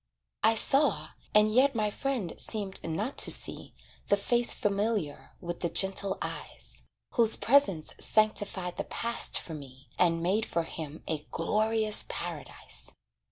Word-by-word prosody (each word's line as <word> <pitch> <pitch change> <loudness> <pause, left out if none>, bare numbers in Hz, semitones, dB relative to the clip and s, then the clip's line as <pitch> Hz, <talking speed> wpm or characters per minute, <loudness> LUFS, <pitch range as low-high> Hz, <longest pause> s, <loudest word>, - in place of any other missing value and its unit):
I 225 +1 +4
saw, 225 - +2 0.3
and 210 0 +5
yet 265 +2 +4
my 210 -2 0
friend 250 -9 -3
seemed 200 -3 -4
not 200 - -3
to - - +3
see - - +2 0.3
The 200 - +3
face 240 +4 +2
familiar, 200 -6 -2
with 175 0 -6
the 170 - -1
gentle 190 +1 +1
eyes, - - -7 0.3
Whose 230 -3 +5
presence 225 - +2
sanctified 205 -4 0
the - - -3
past 235 0 +2
for 165 - -8
me, 135 -3 -11
And 165 -2 +2
made 200 +5 +1
for 170 - -1
him 160 -2 -8
a 150 -2 -4
glorious 215 +4 +1
paradise. - - -6
205 Hz, 140 wpm, -29 LUFS, 170-225 Hz, 0.3 s, and